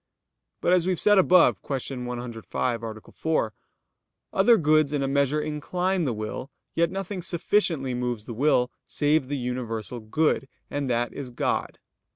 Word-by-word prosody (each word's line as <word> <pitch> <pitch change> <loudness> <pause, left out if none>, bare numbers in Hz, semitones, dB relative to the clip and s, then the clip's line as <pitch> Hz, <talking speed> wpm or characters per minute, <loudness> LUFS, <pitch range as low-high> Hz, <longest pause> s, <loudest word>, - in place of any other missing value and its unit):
But 180 - +3
as 180 -1 +3
we 185 - +3
have 175 - -4
said 205 -2 +5
above 180 -1 +5
(Q. 135 -2 -4
105, 120 -1 -3
A. 110 -1 -6
4), 155 -9 0 0.8
other 225 +5 +5
goods 155 -3 +3
in 145 -2 0
a - - 0
measure 140 +2 +2
incline 175 +4 -1
the 125 - 0
will, 110 +4 -5 0.2
yet 170 0 +2
nothing 190 0 -4
sufficiently 170 -6 +1
moves 120 -3 -2
the 120 - -6
will 125 0 +2 0.2
save 145 -2 +1
the 145 +1 -2
universal 120 -2 -4
good, 135 +5 0 0.2
and 145 -2 -2
that 120 0 0
is 140 -3 -6
God. 120 - -2
140 Hz, 160 wpm, -26 LUFS, 125-165 Hz, 0.8 s, said